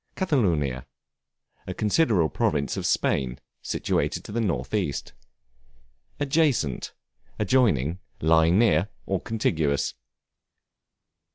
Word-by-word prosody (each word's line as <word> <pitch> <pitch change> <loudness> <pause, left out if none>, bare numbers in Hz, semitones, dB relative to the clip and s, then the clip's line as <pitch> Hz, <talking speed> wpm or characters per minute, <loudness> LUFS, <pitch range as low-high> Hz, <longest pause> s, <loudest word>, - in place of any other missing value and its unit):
Catalonia, 85 - 0 0.8
a 95 - -4
considerable 105 - +2
province 70 - 0
of - - -2
Spain, 65 -1 0 0.2
situated - - -1
to - - -9
the 115 +2 -1
north 75 - -2
east. 90 -10 -2 1.1
Adjacent, 140 - 0 0.4
adjoining, 95 - +2 0.2
lying 80 +2 +4
near, 100 -5 +3 0.2
or 95 -2 -1
contiguous. 80 -10 0
90 Hz, 90 wpm, -25 LUFS, 75-115 Hz, 1.1 s, lying